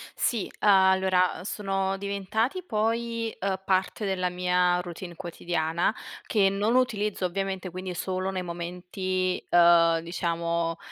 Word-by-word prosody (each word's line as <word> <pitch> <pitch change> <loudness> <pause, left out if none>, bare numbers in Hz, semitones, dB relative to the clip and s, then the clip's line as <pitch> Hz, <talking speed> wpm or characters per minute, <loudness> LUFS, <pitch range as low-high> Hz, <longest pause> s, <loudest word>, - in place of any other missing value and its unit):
Sì, 230 -5 -1
allora, 190 -2 +4
sono 195 -2 -2
diventati 200 - -2
poi, 230 -2 -1
ehm, 190 -1 -2
parte 190 +3 0
della 185 -2 0
mia 180 0 +2
routine 175 0 -8
quotidiana, 170 +1 -1 0.3
che 200 -3 +3
non 205 +4 0
utilizzo 210 -6 +1
ovviamente, 190 0 -3
quindi 185 +1 -6
solo 185 +1 -2
nei 185 -1 -3
momenti, 180 +2 -3
ehm, 170 -1 +6
diciamo, 170 -1 -2
185 Hz, 115 wpm, -27 LUFS, 175-200 Hz, 0.3 s, ehm